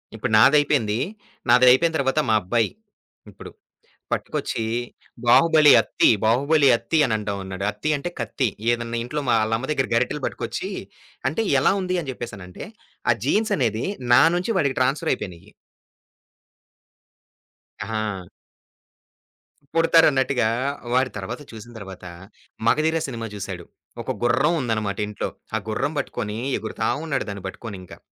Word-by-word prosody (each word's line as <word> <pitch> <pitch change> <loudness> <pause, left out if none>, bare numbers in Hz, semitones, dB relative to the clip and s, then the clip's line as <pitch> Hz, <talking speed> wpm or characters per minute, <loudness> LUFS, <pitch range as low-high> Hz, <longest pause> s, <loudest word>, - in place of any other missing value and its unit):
ఇప్పుడు 110 - -3
నాదైపోయింది. 135 -4 +4 0.5
నాదైపోయిన 125 +7 +5
తరువాత 135 +1 +1
మా 110 - +4
అబ్బాయి, 115 +4 +1 0.6
ఇప్పుడు. - - -11 0.6
పట్టుకొచ్చి, 115 - -2 0.6
"బాహుబలి 155 +3 +6
అత్తి, 110 - +2 0.2
బాహుబలి 140 +6 +3
అత్తి" 160 - -2
అని 120 - -1
అంటావున్నాడు. 100 -2 -5
అత్తి 105 +9 -4
అంటే 145 +5 -4
కత్తి 130 - -1 0.2
ఏదైనా 120 0 -2
ఇంట్లో 150 +5 -3
మా - - +4
వాళ్ళమ్మ 115 +5 -1
దగ్గర 130 -3 0
గరిటెలు 125 +5 0
పట్టుకొచ్చి, - - -4 0.6
అంటే 190 +11 -1 0.2
ఎలా - - +3
ఉంది 185 0 -1
అని 140 - -7
జేప్పేసనంటే, 100 -7 -8 0.4
ఆ - - +7
జీన్సనేది 130 - +1 0.3
నా 120 - +8
నుంచి 185 +6 -1
వాడికి 140 -7 0
ట్రాన్స్‌ఫర్ 135 +5 +1
అయిపోయినాయి. 90 -9 -8 2.3
ఆహా! 110 -5 -4 1.5
పుడతారన్నట్టుగా 135 -7 +4 0.4
వాడి 130 +1 +2
తరువాత 110 +7 -6
చూసిన 115 +1 -11
తర్వాత 95 -3 -10 0.6
'మగధీర' 160 +6 +2
సినిమా 115 -4 -5
చూసాడు. 95 -3 -6 0.4
ఒక - - -3
గుర్రం 120 +7 +3
ఉందనమాట 110 -5 -2
ఇంట్లో. 105 - -4 0.3
ఆ - - +3
గుర్రం 145 +8 -1
బట్టుకొని 105 -5 -4 0.2
ఎగురుతా 110 +1 -3 0.2
ఉన్నాడు 155 -4 -1
దాన్ని 100 -2 -7
బట్టుకొనింకా. 95 -3 -9
120 Hz, 120 wpm, -23 LUFS, 105-145 Hz, 2.3 s, నా